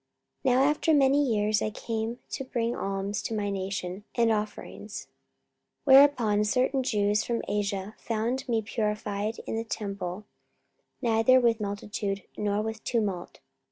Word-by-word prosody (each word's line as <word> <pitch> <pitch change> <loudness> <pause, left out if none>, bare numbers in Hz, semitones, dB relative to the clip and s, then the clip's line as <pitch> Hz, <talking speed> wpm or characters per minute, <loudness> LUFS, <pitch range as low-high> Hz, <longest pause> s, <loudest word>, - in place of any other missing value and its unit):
44:024:017 255 -2 +3
Now 260 - +5
after 300 +3 +2
many 280 +1 +4
years 215 -4 +1
I - - 0
came 225 +1 -3
to - - -3
bring 240 -2 -1
alms 195 +2 -2
to 225 - -3
my 205 -1 -1
nation, 190 0 -4
and 230 -2 +3
offerings. 210 0 -4
44:024:018 - - -38 0.9
Whereupon 240 -7 +5
certain 255 +5 +1
Jews 210 -4 +1
from 235 -1 -2
Asia 200 0 -2
found 240 +4 -2
me 225 -2 +1
purified 210 -1 -2
in - - -3
the 225 - -1
temple, 200 -3 -4 0.8
neither 230 +2 +5
with 235 -3 +2
multitude, 200 -1 -3
nor 210 0 0
with 220 0 -5
tumult. 205 -7 -2
215 Hz, 145 wpm, -28 LUFS, 205-235 Hz, 0.9 s, Now